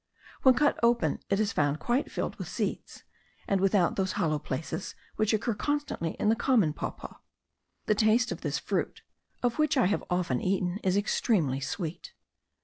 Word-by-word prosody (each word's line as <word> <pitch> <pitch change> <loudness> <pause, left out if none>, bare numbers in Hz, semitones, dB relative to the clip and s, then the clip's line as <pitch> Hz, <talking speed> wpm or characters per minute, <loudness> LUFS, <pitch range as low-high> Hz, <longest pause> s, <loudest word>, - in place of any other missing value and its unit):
When 260 -2 +6
cut 295 -1 +2
open 235 0 +2
it 195 - +2
is 215 0 0
found 145 0 +1
quite 245 - 0
filled - - -3
with - - -6
seeds, - - -4 0.4
and 195 -1 +1
without 195 -3 +2
those 190 -1 0
hollow 160 -6 0
places 155 +8 -5 0.2
which 215 -1 +1
occur 220 +1 0
constantly 290 - -2
in - - 0
the 220 - +4
common 225 - +2
papaw. - - -6 0.7
The - - +3
taste 220 +3 +3
of - - -5
this - - -1
fruit, - - -3 0.4
of 245 +3 0
which 305 -1 +2
I 255 - +4
have 200 +3 0
often 175 -8 0
eaten, 185 0 0
is 185 +1 +2
extremely 185 - +1
sweet. 165 +4 -5
200 Hz, 170 wpm, -29 LUFS, 175-235 Hz, 0.7 s, When